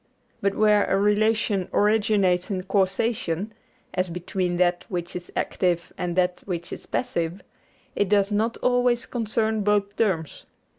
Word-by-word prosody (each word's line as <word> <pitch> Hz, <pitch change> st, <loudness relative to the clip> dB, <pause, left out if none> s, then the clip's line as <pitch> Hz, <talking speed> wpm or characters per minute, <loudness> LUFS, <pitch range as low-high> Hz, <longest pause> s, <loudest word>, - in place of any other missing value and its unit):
But 200 Hz, 0 st, +1 dB
where 210 Hz, -1 st, +4 dB
a 195 Hz, -, +1 dB
relation 210 Hz, -1 st, +2 dB
originates 205 Hz, -4 st, +2 dB
in 185 Hz, -2 st, -2 dB
causation, 195 Hz, 0 st, 0 dB, 0.4 s
as 185 Hz, 0 st, 0 dB
between 180 Hz, +1 st, -2 dB
that 175 Hz, 0 st, +2 dB
which 175 Hz, -2 st, -4 dB
is 175 Hz, 0 st, -7 dB
active 175 Hz, -2 st, -1 dB
and 175 Hz, -1 st, -3 dB
that 180 Hz, -1 st, +1 dB
which 175 Hz, -2 st, -4 dB
is -, -, -9 dB
passive, 170 Hz, -4 st, -2 dB, 0.5 s
it 205 Hz, -, +1 dB
does 200 Hz, 0 st, +3 dB
not 220 Hz, +3 st, 0 dB
always 245 Hz, -1 st, +2 dB
concern 220 Hz, -2 st, -1 dB
both 205 Hz, 0 st, +1 dB
terms. 185 Hz, -9 st, -1 dB
200 Hz, 140 wpm, -25 LUFS, 180-215 Hz, 0.5 s, where